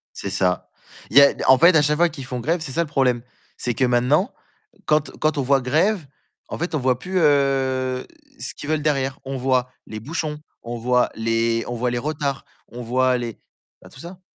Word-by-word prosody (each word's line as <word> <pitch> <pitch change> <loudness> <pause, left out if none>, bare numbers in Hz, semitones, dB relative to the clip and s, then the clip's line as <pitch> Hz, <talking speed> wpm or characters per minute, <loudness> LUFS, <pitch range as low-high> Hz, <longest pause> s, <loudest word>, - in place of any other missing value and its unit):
C'est 100 - -5
ça, 90 -2 0 0.4
Il - - -5
y 140 - +11
a 140 - +6
en 130 0 +7
fait, 170 +4 +6
à 155 - +5
chaque 150 +1 +2
fois 175 +2 +4
qu'ils 140 -5 -9
font 125 -1 -4
grève, 165 +7 0
c'est 150 -4 -6
ça 170 - +1
le - - -3
problème. 130 -5 +1 0.3
C'est 120 - -2
que 130 - +1
maintenant, 125 +8 +2 0.5
quand 150 0 +2
quand 155 -1 0
on - - +1
voit 135 +1 +3
grève, 160 +7 +1 0.4
en - - -5
fait, 170 0 -3
on - - +2
voit 130 -2 +1
plus 185 +8 -2
heu 135 -4 +1 0.3
ce - - -6
qu'ils 145 - -9
veulent 155 -1 0
derrière. 135 -3 0
On 135 0 -4
voit 130 -1 +1 0.2
les 110 0 -7
bouchons, 150 +4 -4 0.2
on 120 +1 -5
voit 125 +1 +2
les 115 +1 0
on 120 - -3
voit 125 +1 -1
les 120 - -1
retards, 140 0 -3 0.2
on 120 +1 -8
voit 130 +2 +2
les 120 -3 -5 0.4
ben - - -14
tout - - -14
ça. 180 +3 -10
135 Hz, 215 wpm, -22 LUFS, 125-150 Hz, 0.5 s, y